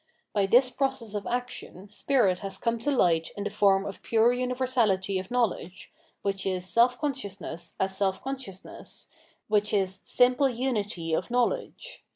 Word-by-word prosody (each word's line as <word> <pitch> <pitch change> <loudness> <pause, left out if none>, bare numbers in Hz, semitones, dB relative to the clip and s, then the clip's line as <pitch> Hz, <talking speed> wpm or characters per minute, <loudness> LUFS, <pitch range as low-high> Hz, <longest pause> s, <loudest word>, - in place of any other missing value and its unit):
By 200 -2 +2
this 250 +4 +5
process 265 -6 -2
of 205 -1 -4
action 240 -5 -5
spirit 210 -6 +2
has 195 -1 -6
come 230 +2 -1
to 275 - -1
hght 170 - +2
in 200 - -3
the 205 - -3
form 200 -2 +3
of 200 - -7
pure 230 +2 +3
universahty 245 -7 +1
of 185 - -8
knowledge, 225 - -2 0.3
which 195 -1 -2
is 185 -1 -2
self 240 +6 +3
consciousness 200 - -4
as 190 0 0
self 190 -1 0
con 270 +1 -2
sciousness, 195 -8 -10 0.4
which 210 0 +2
is 190 -2 0
simple 250 +2 +3
unity 210 -9 -2
of 160 - -1
knowledge. - - -2
210 Hz, 160 wpm, -27 LUFS, 195-250 Hz, 0.4 s, this